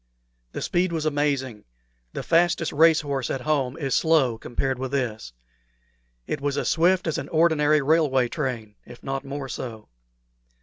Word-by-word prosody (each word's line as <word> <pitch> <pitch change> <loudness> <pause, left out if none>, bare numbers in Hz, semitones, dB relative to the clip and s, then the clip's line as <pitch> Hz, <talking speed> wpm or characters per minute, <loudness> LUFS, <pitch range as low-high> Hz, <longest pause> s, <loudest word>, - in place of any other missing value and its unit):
The - - -4
speed 175 0 0
was 160 -2 -2
amazing; 140 -6 -1 0.5
the - - -5
fastest 170 -1 +2
race 160 +1 +5
horse 140 -4 -3
at 135 - -3
home 135 -3 -1
is 135 -4 -2
slow 140 -8 +2
compared 130 +2 -3
with 130 0 -4
this. 115 - -2 0.9
It 140 - -4
was 145 0 -1
as - - 0
swift 180 +3 +2
as 160 - -1
an - - -7
ordinary 155 -2 +3
railway 140 -4 +2
train, 120 -7 -4
if 120 0 -14
not 135 0 -3
more 140 0 -6
so. 115 -4 -7
140 Hz, 160 wpm, -24 LUFS, 130-160 Hz, 0.9 s, race